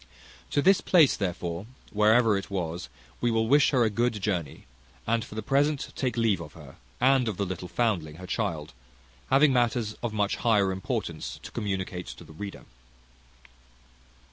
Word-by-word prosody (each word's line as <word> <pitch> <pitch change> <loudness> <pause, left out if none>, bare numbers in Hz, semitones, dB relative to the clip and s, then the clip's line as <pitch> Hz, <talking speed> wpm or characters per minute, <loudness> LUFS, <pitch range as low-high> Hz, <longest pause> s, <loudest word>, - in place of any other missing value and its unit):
To 145 - +1
this 195 +1 +5
place 165 -7 +5
therefore, 90 0 -3 0.2
wherever 110 +1 +4
it 100 - -4
was, 85 -7 -4 0.3
we 120 - +2
will 110 -1 +1
wish 145 +3 +5
her 130 -4 +3
a 110 - +3
good 115 +1 0
journey, 90 -7 -3 0.4
and 115 0 +1
for - - -11
the 110 - -4
present 145 0 +1
take 125 -3 -2
leave 110 -6 +2
of 75 -3 -9
her, - - -13 0.2
and 130 -1 +4
of 105 -4 -2
the 100 - 0
little 90 -1 -5
foundling 90 -8 -1
her 90 +3 -9
child, 85 -8 -3 0.6
having 135 +1 +5
matters 120 -3 +1
of 120 - -2
much 105 -1 0
higher 105 -5 +3
importance 95 0 -4
to - - -9
communicate 95 -4 -3
to - - -9
the 80 -1 -14
reader. 100 +5 -7
105 Hz, 170 wpm, -27 LUFS, 90-120 Hz, 0.6 s, this